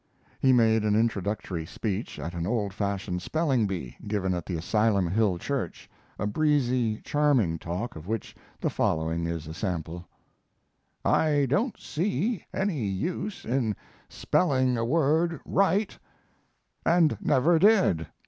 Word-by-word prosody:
He 130 - +4
made 110 -3 +4
an 105 -1 +2
introductory 100 -5 -1
speech 100 +5 -4
at 80 +4 -5
an 85 0 -3
old 105 -3 -1
fashioned 95 -3 -2
spelling 135 - +1
bee, 85 -11 -5
given 100 -3 0
at 85 -2 -4
the 90 - -2
Asylum 100 +2 +1
Hill 100 0 +1
Church; 125 -1 -4 0.3
a 105 - -2
breezy, 125 -3 +1
charming 130 - +2
talk 90 +10 -4
of 80 +2 -9
which 110 0 -4 0.2
the - - -1
following 80 +1 0
is 85 -2 -4
a 80 - -7
sample: 85 -1 -4 1.0
I 145 -3 +3
don't 205 - 0
see 190 - -1
any 190 - -1
use 170 - -3
in 115 -4 0 0.3
spelling 130 -7 +1
a 115 - -1
word 160 +5 +2
right 195 +2 +1 0.9
and 170 -3 +4
never 150 +5 +3
did. 190 - +4
110 Hz, 135 wpm, -27 LUFS, 90-150 Hz, 1.0 s, He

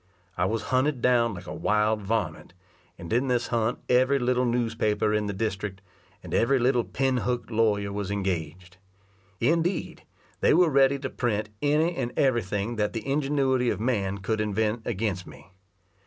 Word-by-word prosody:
I 90 - +1
was 110 +3 -1
hunted 130 +1 +2
down 120 -3 +2
like 90 - -9
a - - -6
wild 105 0 +1
varment, 110 -3 -2 0.4
and 85 +4 -6
in 125 +3 +2
this 125 -1 0
hunt 115 0 0
every 130 +3 +3
little 125 0 +1
newspaper 115 -3 0
in 105 -1 0
the - - -1
district, 100 -1 -3 0.4
and - - -8
every 135 +4 +3
little 125 -1 +2
pin 130 +1 0
hook 125 -1 -2
lawyer 105 -3 +1
was 100 -1 -3
engaged. 90 -3 -3 0.6
Indeed, 165 +8 0 0.4
they - - +4
were 175 -1 +5
ready 140 0 +4
to 140 - -5
print 110 -4 -1
any 155 +4 +2
and 120 -7 -3
every 130 -4 +3
thing 105 +4 -3
that 105 -1 0
the 115 -2 -5
ingenuity 135 -3 +1
of - - -2
man 100 -5 -1
could 110 +3 -2
invent 110 +2 0
against 100 -4 -2
me. 95 - -14
115 Hz, 170 wpm, -26 LUFS, 105-130 Hz, 0.6 s, were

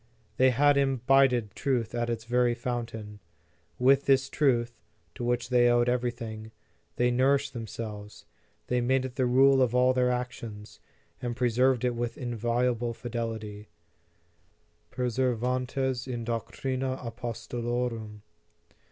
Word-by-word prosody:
They 130 0 +5
had 145 +3 +4
imbibed 135 -4 +3
truth 125 -5 -1
at 120 0 -1
its 115 -1 -3
very 120 0 +2
fountain. 115 -3 -5 0.6
With 135 +2 +4
this 135 -1 +3
truth, 120 -5 +1 0.3
to - - -7
which 120 0 -1
they 120 -1 +4
owed 120 0 +3
everything, 115 -3 -3 0.4
they 125 0 +2
nourished 140 +2 +2
themselves; 110 -2 -7 0.4
they 125 0 0
made 130 +2 +1
it 130 - -6
the 130 -1 0
rule 135 +2 +5
of 125 -1 +2
all 125 +1 +4
their 125 -1 +2
actions, 120 -4 -5 0.4
and 120 -1 -3
preserved 125 +1 +2
it 125 - +1
with 120 0 -3
inviolable 120 -1 -1
fidelity; 110 -3 -5 1.2
perseverantes 125 +1 -1
in 120 -2 -4
doctrina 130 +3 -3
apostolorum. 115 -2 -4
120 Hz, 120 wpm, -28 LUFS, 115-130 Hz, 1.2 s, They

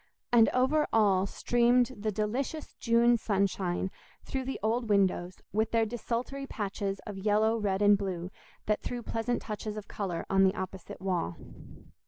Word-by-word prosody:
And 230 -3 +6
over 270 +4 +2
all 200 -3 +3
streamed 245 +3 +2
the 215 +1 -2
delicious 245 +9 -3
June 235 0 +4
sunshine 190 -3 0 0.3
through 265 -1 -3
the 265 - -4
old 230 +1 0
windows, 185 -3 +1
with 220 +1 +1
their 225 -1 +2
desultory 240 +4 -3
patches 200 -3 -3
of 205 -2 -6
yellow, 215 +2 +2
red, 205 -2 0
and 205 0 +7
blue, 185 -2 -4 0.3
that 210 0 0
threw 245 -1 -4
pleasant 230 +2 -2
touches 215 0 -5
of 210 - -7
colour 185 -5 -3
on 195 0 +4
the 190 +1 +3
opposite 190 -1 -6
wall. 180 - -1
215 Hz, 155 wpm, -30 LUFS, 195-235 Hz, 0.3 s, and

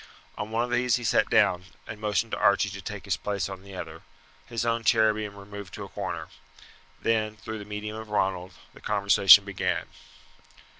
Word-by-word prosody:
On 105 - -5
one 115 +2 0
of 120 - -4
these 120 0 +2
he 120 - -4
sat 110 - +2
down, 90 +1 +3 0.2
and 110 -1 -9
motioned 105 +1 0
to - - -2
Archie 100 0 +3
to 100 0 -7
take 105 +3 -7
his 95 -2 0
place 100 -1 -2
on 95 -1 -8
the 100 0 -12
other - - -7 0.5
his 120 -1 -3
own 115 0 0
chair 110 -1 +4
being 105 -1 -5
removed 100 -1 -9
to - - -6
a - - -9
corner. - - -5 0.7
Then, 110 -1 0
through 110 +1 -6
the 105 - -8
medium 105 +1 -5
of 110 -1 -8
Ronald, 95 -3 -1 0.2
the - - -16
conversation 100 -1 +6
began. 100 -2 -2
105 Hz, 195 wpm, -27 LUFS, 100-110 Hz, 0.7 s, conversation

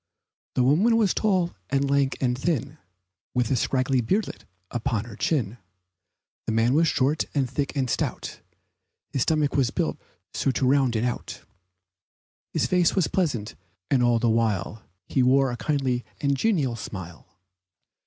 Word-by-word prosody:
The 125 - +3
woman 190 - +4
was 210 -5 +3
tall, 185 -5 +1 0.2
and 140 0 +1
lank, 140 -1 +1
and 125 -2 +1
thin, 145 0 -2 0.6
With 125 -1 +1
a - - +3
scraggy 130 +1 +1
beardlet 195 - -2 0.3
upon 115 -2 -1
her 115 -3 -10
chin, 120 -6 -1 0.9
The - - 0
man 115 +3 +2
was 165 +3 +4
short, 145 +2 +1
and 135 -3 +2
thick 140 +4 -3
and 135 -2 0
stout, - - -3 0.7
His 135 - 0
stomach 150 0 +1
was 135 -4 +2
built - - -2 0.3
so - - 0
it 130 - 0
rounded 130 -4 +2
out, 120 - -4 1.1
His - - 0
face 180 -2 +2
was 190 -5 +2
pleasant, 135 - -1 0.4
and 135 -3 +4
all 120 -1 +3
the 120 - +1
while 110 -2 0 0.2
He 130 - 0
wore 130 +1 +4
a - - -3
kindly 130 -5 -1 0.2
and 140 -1 +1
genial 145 - +1
smile. 90 - -9
130 Hz, 155 wpm, -25 LUFS, 120-150 Hz, 1.1 s, woman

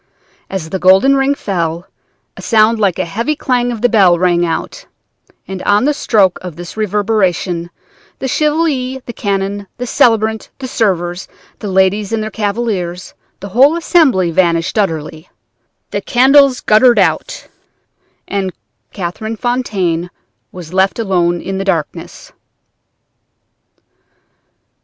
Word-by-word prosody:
As 170 -5 -5
the 190 - -2
golden 190 +10 +5
ring 270 +1 +1
fell, 170 -6 -3 0.5
a - - -10
sound 220 0 +3
like 195 -5 +2
the 185 - -2
heavy 230 - -2
clang 245 -3 0
of 235 0 -3
a - - +7
bell 195 -7 +4
rang 175 -1 +2
out, 175 - -4 0.6
and 190 -1 -6
on 205 +4 +2
the 295 - +2
stroke 205 -9 +2
of 180 -4 -8
this 175 +1 -9
reverberation 200 -5 -1 0.5
the 265 - -4
Chevalier, 290 -3 0
the 235 - -7
canon, 200 -1 -3
the 250 - -4
celebrant, 220 -2 +1
the 260 - -6
servers, 180 -6 -1 0.3
the 210 - -6
ladies 190 +2 +1
and 225 -1 -1
their 215 - -5
cavaliers, 200 -5 -3 0.3
the 200 - -7
whole 270 - +4
assembly 275 - +2
vanished 170 -1 +1
utterly; 160 -5 -2 0.6
the - - -2
candles 270 +1 +4
guttered 235 +2 +4
out, 180 -6 0 0.8
and 195 -2 -2 0.4
Catherine 205 +4 -5
Fontaine 195 -9 -1 0.4
was 175 -2 -10
left 190 +1 +1
alone 175 -6 0
in 190 +1 -4
the - - -2
darkness." 170 -6 -4
200 Hz, 130 wpm, -15 LUFS, 180-240 Hz, 0.8 s, a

